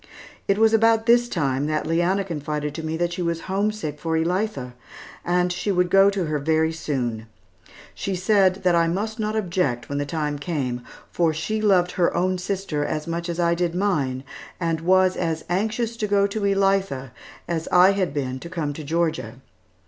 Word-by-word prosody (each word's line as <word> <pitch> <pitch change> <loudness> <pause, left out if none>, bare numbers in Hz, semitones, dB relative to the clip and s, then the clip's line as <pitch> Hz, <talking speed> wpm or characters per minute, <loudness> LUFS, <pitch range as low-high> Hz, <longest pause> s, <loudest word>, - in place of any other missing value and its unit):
It 200 - +2
was 225 0 +4
about 225 0 +4
this 240 +1 +4
time, 140 - 0
that 155 0 -1
Leanna 175 +4 +1
confided 150 -4 -4
to 160 - -5
me 160 0 -3
that 175 0 -1
she 180 - -4
was 170 -1 -1
homesick 195 -6 -2
for 165 -1 -1
Elitha, 165 - -1 0.5
and 180 0 +1
she 200 - -2
would 180 -2 +1
go 195 +1 +6
to 195 -3 -1
her 155 -1 -1
very 160 +2 +1
soon. 120 -8 -3 0.7
She 195 - -3
said 190 0 +2
that 180 -1 +3
I 170 -1 +3
must 215 +6 -2
not 215 0 -1
object 175 - -1
when 140 0 -2
the 145 - -1
time 150 -2 -2
came, 135 -6 -2 0.3
for 165 -3 +1
she 215 +7 -2
loved 185 -4 +3
her 175 - +1
own 185 +1 +1
sister 185 -5 -2
just - - -3
as 155 -1 -3
much 170 +1 -3
as 170 0 -3
I 170 -1 +3
did 170 0 -1
mine, 145 -10 0 0.4
and 165 -2 -1
was 185 +1 +3
as 165 -2 -2
anxious 220 +5 -1
to 215 - -1
go 200 -1 +3
to 200 +2 -3
Elitha 195 -9 +1 0.4
as 165 -2 -2
I 180 +2 +7
had 195 -5 0
been 130 -3 -3
to 170 - -9
come 160 -5 -3
to 155 - -7
Georgia. 155 -7 -1
175 Hz, 195 wpm, -23 LUFS, 155-195 Hz, 0.7 s, I